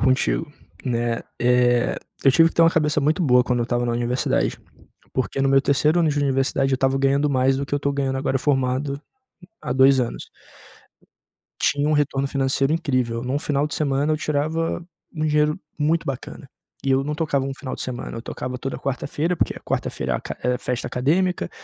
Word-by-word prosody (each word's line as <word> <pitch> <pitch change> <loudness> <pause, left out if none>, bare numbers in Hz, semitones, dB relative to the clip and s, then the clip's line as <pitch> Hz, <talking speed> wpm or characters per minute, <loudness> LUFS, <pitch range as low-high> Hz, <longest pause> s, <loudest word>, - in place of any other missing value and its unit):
contigo, 135 +4 +1 0.3
né, 120 -2 -1 0.2
eh, 125 0 +3 0.3
eu 135 - +6
tive 165 +2 +6
que - - -13
ter 170 - +5
uma 165 - +6
cabeça 150 -2 +1
muito 155 +5 +1
boa 125 -5 +4
quando 125 -1 0
eu - - +2
estava 120 0 -1
na 120 - 0
universidade, 120 +2 0 0.5
porque 130 +1 -2
no 135 - +2
meu 135 0 +5
3º 150 +5 +2
ano 165 - +3
de 145 -1 0
universidade 135 -1 +1
eu - - +5
estava 135 +1 +1
ganhando 140 +2 +2
mais 130 0 +2
do 140 - -2
que 145 - -2
eu - - +3
estou 140 0 -1
ganhando 135 -1 -1
agora, 135 0 0
formado 140 +1 0 0.6
há - - -4
2 130 0 +5
anos 120 - -3 1.3
Tinha 145 +1 +1
um - - +2
retorno 140 -2 +1
financeiro 135 +1 0
incrível, 130 -8 0
num 130 +3 -1
final 145 0 0
de 145 - -5
semana 145 +1 +1
eu - - -1
tirava 155 +3 -1 0.3
um 155 -1 -2
dinheiro 150 0 +2 0.2
muito 160 +2 +1
bacana, 135 +1 -6 0.4
e 135 - -1
eu 135 +1 +3
não 150 +2 -2
tocava 150 -4 0
um 135 - -3
final 135 -1 -6
de - - -7
semana, 125 -2 -5
eu - - -5
tocava 125 +1 -5
toda 135 0 -4
quarta-feira, 145 +6 -2
porque - - 0
a - - -8
quarta-feira - - -2
é - - +1
aca - - -6
é 125 0 +1
festa 125 -1 -3
acadêmica, 175 +8 0
135 Hz, 200 wpm, -23 LUFS, 130-150 Hz, 1.3 s, eu